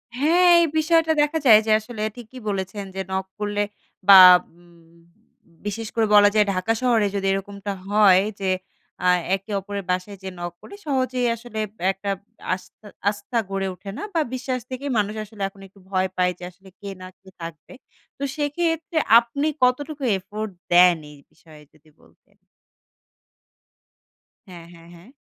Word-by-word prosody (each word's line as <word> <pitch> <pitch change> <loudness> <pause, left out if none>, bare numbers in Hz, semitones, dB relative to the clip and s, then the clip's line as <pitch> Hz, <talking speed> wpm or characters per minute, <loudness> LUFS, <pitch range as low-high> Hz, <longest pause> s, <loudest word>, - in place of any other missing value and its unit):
হ্যাঁ, 335 +7 +3
এই 335 - +4
বিষয়টা 325 0 +3
দেখা 295 +2 +1
যায় 215 -3 +8
যে, 220 - 0
আসলে 215 0 -9
ঠিকই 245 +1 -11
বলেছেন 195 +1 -4
যে, 190 - -2
নক 190 0 -2
করলে 205 0 -1 0.4
বা 195 -1 +11 0.4
উম 170 -1 -22 0.7
বিশেষ 215 +2 -4
করে 225 -1 +2
বলা 205 0 +7
যায়, 210 -1 +5
ঢাকা 185 +5 0
শহরে 230 -5 +2
যদি 195 -1 -1
এরকমটা 200 +1 -4 0.2
হয় 200 -2 +5 0.2
যে, 195 -1 -1 0.6
আ - - +4 0.3
একে 195 +3 -10
অপরের 200 +1 -6
বাসায় 185 +2 -2
যেয়ে 190 -1 -7
নক 175 -1 -5
করে 400 - -12
সহজেই 255 -3 0
আসলে 230 -1 -8
আব - - -26 0.2
একটা 195 +1 -6 0.4
আস্তা 200 +3 -10 0.2
আস্থা 205 +3 -5
গড়ে 195 0 -2
ওঠে 195 +2 -11
না - - -6
বা 325 - +2
বিশ্বাস 255 0 -3
থেকেই 265 +2 -5
মানুষ 210 +1 0
আসলে 210 -1 -13
এখন 195 0 -19
একটু 195 +1 -23
ভয় 185 -1 0
পায়। 180 0 +2
যে 180 - -11
আসলে 190 +2 -19
কে 200 - -7
না 185 - -8
কে 190 - -17
থাকবে। 165 - -9 0.4
তো 280 - -6
সেক্ষেত্রে 325 +2 -2 0.2
আপনি 280 +6 -3 0.2
কতটুকু 285 +3 0
এফোর্ট 210 +3 -6 0.2
দেন 175 0 +6
এই 145 - -15
বিষয়ে 155 -2 -18
যদি 155 0 -25
বলতেন? - - -27 2.1
হ্যাঁ, 175 -3 -11
হ্যাঁ, 165 0 -16
হ্যাঁ। 170 +6 -17
205 Hz, 160 wpm, -23 LUFS, 190-250 Hz, 2.1 s, বা